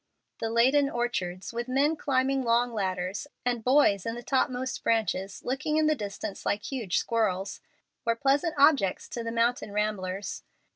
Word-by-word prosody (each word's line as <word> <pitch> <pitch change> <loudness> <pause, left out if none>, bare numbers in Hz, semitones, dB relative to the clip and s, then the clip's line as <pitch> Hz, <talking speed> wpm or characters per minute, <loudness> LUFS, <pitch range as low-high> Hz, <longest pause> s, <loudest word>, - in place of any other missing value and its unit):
The 225 - -2
laden 265 +5 +4
orchards, 215 -7 -3
with 240 +1 -3
men 280 +5 +2
climbing 270 -2 +1
long 240 0 +2
ladders, 185 +2 -2 0.2
and 240 -2 0
boys 250 -7 +4
in 230 0 -3
the 240 - -7
topmost 260 0 -1
branches 205 -4 0
looking 270 +4 -1
in 310 - +3
the 310 - +4
distance 205 -4 -5
like 205 0 -1
huge 235 -10 -2
squirrels, 200 -4 -1 0.4
were 230 -1 +1
pleasant 280 +6 +1
objects 275 -10 +4
to 235 - -4
the 230 - -3
mountain 235 -1 0
ramblers. 200 -2 -2
235 Hz, 155 wpm, -28 LUFS, 205-265 Hz, 0.4 s, laden